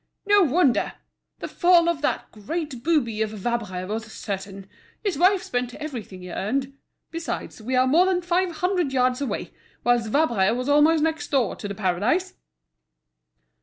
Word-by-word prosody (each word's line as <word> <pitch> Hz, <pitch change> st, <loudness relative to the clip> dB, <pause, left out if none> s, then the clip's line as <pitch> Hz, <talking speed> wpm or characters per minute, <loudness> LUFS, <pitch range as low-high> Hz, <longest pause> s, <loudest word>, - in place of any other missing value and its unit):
"No 410 Hz, 0 st, +5 dB
wonder! 300 Hz, -5 st, +2 dB, 0.5 s
The -, -, -3 dB
fall 345 Hz, -1 st, +4 dB
of 340 Hz, -4 st, 0 dB
that 295 Hz, -, -1 dB
great 275 Hz, +4 st, -5 dB
booby 240 Hz, -8 st, +1 dB
of 215 Hz, 0 st, -1 dB
a -, -, -7 dB
Vabre 205 Hz, -4 st, -3 dB
was 220 Hz, +2 st, -5 dB
certain. 195 Hz, -1 st, -6 dB, 0.4 s
His 405 Hz, -4 st, 0 dB
wife 370 Hz, +5 st, +3 dB
spent 245 Hz, 0 st, -3 dB
everything 235 Hz, -11 st, -7 dB
he 180 Hz, -, -8 dB
earned. 265 Hz, +9 st, -2 dB, 0.4 s
Besides, 330 Hz, -7 st, -5 dB
we 255 Hz, +4 st, -2 dB
are 255 Hz, 0 st, +4 dB
more 330 Hz, +8 st, +4 dB
than 360 Hz, -1 st, +1 dB
five 355 Hz, +1 st, +1 dB
hundred 350 Hz, -3 st, -1 dB
yards 255 Hz, 0 st, +2 dB
away, 280 Hz, -, -3 dB, 0.3 s
whilst 240 Hz, -2 st, +2 dB
Vabre 230 Hz, -7 st, +2 dB
was 250 Hz, +1 st, -3 dB
almost 300 Hz, +2 st, +4 dB
next 320 Hz, -1 st, -1 dB
door 260 Hz, -8 st, +1 dB
to -, -, -6 dB
The 200 Hz, -, -5 dB
Paradise." 215 Hz, -, 0 dB
260 Hz, 165 wpm, -24 LUFS, 220-330 Hz, 0.5 s, No